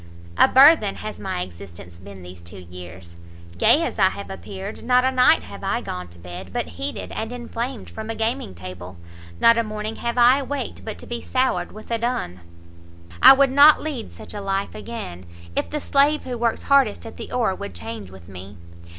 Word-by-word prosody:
A - - +6
burthen 270 -6 +6
has 215 - -7
my 90 - -3
existence 90 -1 -12
been 95 0 -12
these 90 0 -11
two 85 0 -12
years, 90 -1 -11 0.4
gay 315 - +5
as 280 - -4
I 190 -1 +5
have 200 0 -8
appeared; 195 +1 -8
not 250 +1 +3
a 260 - +2
night 250 - +4
have 100 +1 -11
I - - 0
gone 90 0 -6
to 85 0 -16
bed, 90 +2 -9
but 85 - -3
heated 90 +2 -5
and 220 +1 -4
inflamed 240 0 -5
from 220 0 -8
a 225 - -3
gaming 225 - -2
table; 90 0 -9 0.4
not 230 0 +6
a - - +2
morning 215 0 -5
have 235 +1 -3
I 245 +3 +6
awaked, 275 -2 -5
but 220 - -6
to - - -11
be 240 0 -5
soured 260 0 0
with 215 +3 -12
a 230 - 0
dun! 225 - -2 0.8
I - - +11
would 270 -1 +3
not 285 +3 +7
lead 285 -7 -5
such - - -11
a 205 - -5
life 195 0 -2
again, 90 - -8 0.3
if - - -1
the 300 - -3
slave 285 +2 +2
who 250 - -5
works 235 -1 -1
hardest 275 -8 +2
at 225 - -10
the - - -8
oar 230 -6 +1
would 95 - -8
change 105 +2 -7
with 95 -2 -14
me. 95 +1 -10
210 Hz, 200 wpm, -22 LUFS, -, 0.8 s, I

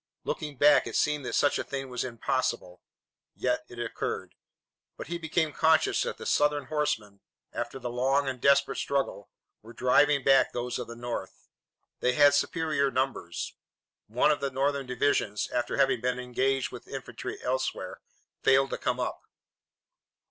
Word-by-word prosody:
Looking 150 -3 -4
back, 145 +2 +5
it - - -5
seemed 150 -2 +1
that - - -2
such 145 - +3
a - - -1
thing 135 -1 -5
was 125 -1 -3
impossible. 110 -6 -2 0.5
Yet 125 0 0
it 120 - -11
occurred. 120 -1 -4 0.6
But - - -6
he 170 0 -3
became 160 -1 0
conscious 160 +1 +3
that - - -2
the - - -9
Southern 145 -1 +2
horsemen, 130 -10 -2 0.3
after - - -4
the 125 -2 -5
long 135 +3 +1
and 130 -2 -4
desperate 140 0 +3
struggle, 135 -7 -2 0.3
were 115 +2 -13
driving 135 +4 +3
back 135 -1 +5
those 125 +1 -3
of 125 - -5
the 115 - -8
North. 120 0 -6 0.5
They 125 - +2
had 145 +1 +6
superior 150 -2 +1
numbers. 130 -10 -2 0.5
One 120 +7 +3
of 150 - 0
the 140 -1 -1
Northern 135 0 -1
divisions, 125 -5 0
after 120 - -1
having 135 -4 +3
been 125 0 0
engaged 130 +1 0
with - - -10
infantry - - -6
elsewhere, 130 +1 -2 0.4
failed 135 0 +4
to - - -3
come - - -1
up. - - -3
135 Hz, 160 wpm, -28 LUFS, 125-145 Hz, 0.6 s, had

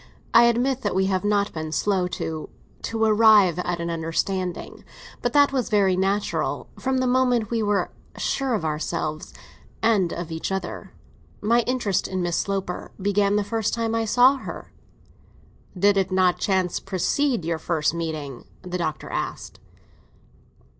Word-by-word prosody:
"I 235 +1 +8
admit 245 +3 +1
that 205 -5 -2
we 190 0 +2
have 190 0 0
not 205 0 +1
been 155 -1 -5
slow 190 +1 +1
to—to 175 +7 -5
arrive 210 -5 +5
at 175 -1 -2
an 170 0 -3
understanding. 170 +2 -3 0.4
But 245 0 -1
that 285 -1 +5
was 255 -4 -1
very 195 -3 +3
natural, 195 +2 -1
from 265 0 0
the 255 - +1
moment 250 -3 +2
we 230 -1 0
were 205 -1 0 0.3
sure 270 -3 0
of 170 - -3
ourselves—and 165 +5 -2
of 170 -1 -5
each 160 +3 -4
other. 190 0 -4 0.5
My 230 +3 +3
interest 245 -7 0
in 185 -1 -2
Miss 175 -1 -1
Sloper 195 -2 -3
began 200 +1 +2
the 210 - +2
first 220 +1 -1
time 230 -1 -1
I 225 0 0
saw 250 +5 +5
her." - - -8 1.1
"Did 200 +2 +4
it 190 -1 +1
not 185 -1 +3
by - - -25
chance 185 -3 0
precede 200 - 0
your 165 -1 -1
first 155 -1 0
meeting?" 155 -6 -5 0.2
the 180 0 -4
Doctor 155 -3 -3
asked. - - -5
195 Hz, 155 wpm, -24 LUFS, 175-225 Hz, 1.1 s, I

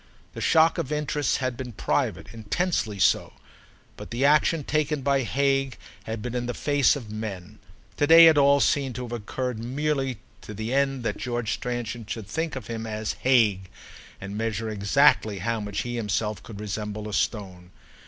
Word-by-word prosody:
The - - -7
shock 165 +1 +4
of 150 -4 -3
interests 150 -2 0
had 130 -2 -2
been 125 -1 -7
private, 100 0 -2
intensely 110 - -1
so; - - +2 0.6
but - - -9
the 120 +4 0
action 150 +2 +3
taken 150 -1 -1
by 140 0 +2
Hague 135 +1 0 0.3
had 110 -1 -5
been 125 - -4
in 120 -1 -2
the 125 - -3
face 145 -1 +3
of 115 -7 -8
men. 105 -2 -6 0.4
To 145 - +2
day 165 +1 +9
it 160 -1 +7
all 140 0 +5
seemed 135 -5 +1
to 125 - -4
have 120 - -8
occurred 120 +1 -4
merely 135 +1 -1 0.2
to 105 - -9
the 110 +4 -3
end 135 -2 +1
that - - -2
George 120 -3 -2
Stransom 120 -1 -4
should 110 -1 -5
think 160 +9 -3
of 130 -4 -6
him 115 -1 -5
as 110 0 -3
"Hague" 105 -8 +3 0.5
and 100 +1 -7
measure 110 0 -2
exactly 110 +1 +3
how 115 +5 -2
much 105 -1 -3
he 120 0 -4
himself 105 -1 -2
could 105 -3 -10
resemble 105 0 -4
a 105 - -6
stone. 95 -5 -2
120 Hz, 180 wpm, -25 LUFS, 105-140 Hz, 0.6 s, day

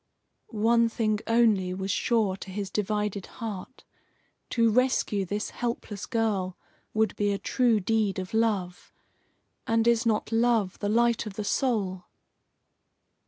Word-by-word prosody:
One 230 0 +4
thing 215 -2 0
only 215 -6 +3
was 190 +1 -2
sure 215 -3 +1
to 195 - -9
his 195 0 -4
divided 210 -1 -2
heart 225 +2 -7 0.7
to 230 -2 +3
rescue 230 -4 +1
this 205 +3 -3
helpless 230 -4 -4
girl 210 -6 -1 0.3
would 220 0 +1
be 205 -1 +1
a 200 - 0
true 240 0 +2
deed 210 0 0
of 185 +1 -5
love. 205 -6 -1 0.8
And 225 0 +2
is 235 0 +4
not 220 -1 0
love 225 -4 +2
the 205 - -1
light 235 0 +2
of 200 - -7
the 210 - -3
soul? 200 -6 -1
215 Hz, 135 wpm, -27 LUFS, 195-230 Hz, 0.8 s, One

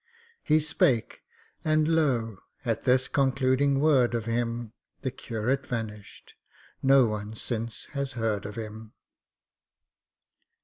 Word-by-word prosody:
He 155 +1 +3
spake, 135 -6 +1 0.4
and 155 0 +2
lo! 125 - +1 0.3
at - - -1
this 130 +1 +3
concluding 135 0 +2
word 135 -5 +4
of 115 -2 -2
him, 115 -1 -2 0.3
The 130 - -2
curate 125 +2 -2
vanished—no 115 +4 -1
one 105 0 -4
since 115 0 -4
has 140 -2 -3
heard 110 -4 -1
of 105 - -8
him. 110 -1 -8
120 Hz, 105 wpm, -27 LUFS, 110-135 Hz, 0.4 s, word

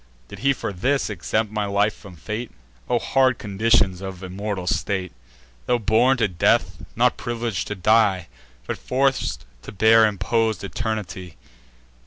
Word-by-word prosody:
Did - - -10
he 140 - +3
for 120 -6 -3
this 130 +6 0
exempt 105 +3 -2
my 105 -1 -1
life 100 +1 +1
from 100 -4 -13
fate? 110 +8 -5 0.4
O 120 - +3
hard 130 0 +2
conditions 100 -2 +1
of 95 -1 -7
immortal 95 0 -4
state, 95 0 -1 0.6
Tho' 125 - +3
born 115 +4 +3
to 115 -3 +2
death, 90 -4 +1
not - - +2
privileg'd 115 -5 -3
to 105 - -4
die, 100 -2 +3 0.4
But - - -4
forc'd 135 - 0 0.2
to - - -9
bear 110 +2 +5
impos'd 110 +2 0
eternity! 95 -2 -5
105 Hz, 145 wpm, -23 LUFS, 95-115 Hz, 0.6 s, bear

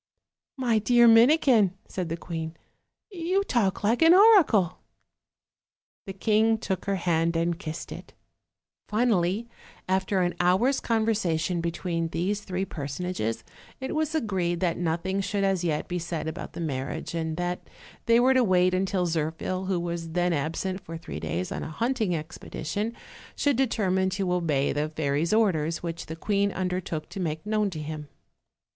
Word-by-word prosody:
"My 240 -4 +2
dear 240 +2 +5
Minikin," 230 - +5
said 180 -3 -4
the 165 - -3
queen, 165 -1 -5 0.5
"you 370 +2 0
talk 210 - 0
like 225 +6 +2
an 325 +2 +8
oracle." 370 - +5 1.3
The 195 - -5
king 220 +3 +2
took 190 -4 -3
her 200 - 0
hand 170 -2 +1
and 170 +1 0
kissed 160 -4 -6
it. - - -10 0.7
Finally, 215 -2 +1 0.4
after 190 +1 +1
an 175 - 0
hour's 190 +10 +3
conversation 190 -7 0
between 170 0 -2
these 190 +5 -1
three 190 -1 -3
personages, 145 - -4 0.4
it 265 - -4
was 310 0 -1
agreed 185 - 0
that 175 -2 +1
nothing 175 +3 -1
should 200 +1 -1
as 190 -2 +1
yet 155 -3 -1
be 180 0 -2
said 165 -2 -4
about 160 0 -6
the - - -6
marriage, 140 +1 -4
and 160 -1 -2
that 175 0 -3 0.4
they 230 0 +6
were 255 +2 +5
to 260 -1 +4
wait 185 -3 +3
until 185 0 0
Zirphil, 165 +3 -2
who 190 -2 0
was 170 -1 -4
then 175 0 +1
absent 165 +6 -2
for 165 -1 -7
three 165 - -7
days 85 +3 -3
on - - -3
a - - -5
hunting 220 0 0
expedition, 175 +6 -4 0.4
should 285 -2 +2
determine 195 -7 +1
to 190 -1 -1
obey 155 -6 +1
the 150 +1 -1
fairy's 155 +1 -1
orders, 170 -8 +1
which 170 -1 -5
the 160 - -5
queen 200 +3 0
undertook 180 -4 -3
to - - -7
make 160 -2 -3
known 210 -1 +1
to 165 -4 -6
him. 150 0 -6
180 Hz, 160 wpm, -27 LUFS, 165-215 Hz, 1.3 s, an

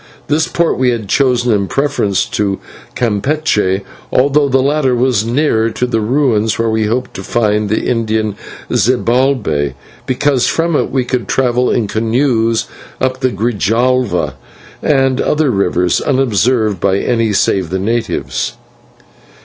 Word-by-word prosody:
This 155 +2 +2
port 170 -5 0
we 130 -1 +3
had 115 -4 -2
chosen 125 0 +2
in 100 -2 0
preference 120 -8 0
to 100 -2 -1 0.4
Campeche, 105 -4 0 0.3
although 140 +2 +3
the 135 - +3
latter 135 -1 +1
was 120 -4 +1
nearer 115 -2 +1
to 125 - -2
the 115 -3 -1
ruins 115 -2 +1
where 115 -1 0
we 110 -1 0
hoped 125 +4 -2
to 95 - -7
find 105 -1 0
the 110 - -1
Indian 110 -3 -1 0.4
Zibalbay, 120 - +1 0.3
because 130 0 +1
from 165 0 0
it - - 0
we 130 -2 -1
could 125 -4 -2
travel 125 -1 +1
in 110 - 0
canoes 115 +1 +1 0.3
up 130 0 -1
the 130 -1 +1
Grijalva 120 +3 0 0.5
and 135 -2 +2
other 150 -3 +1
rivers, 90 -4 +1
unobserved 120 -5 +1
by 95 +3 +1
any 115 0 0
save 95 -3 +1
the 95 - -1
natives. 110 - -2
120 Hz, 140 wpm, -14 LUFS, 105-130 Hz, 0.5 s, we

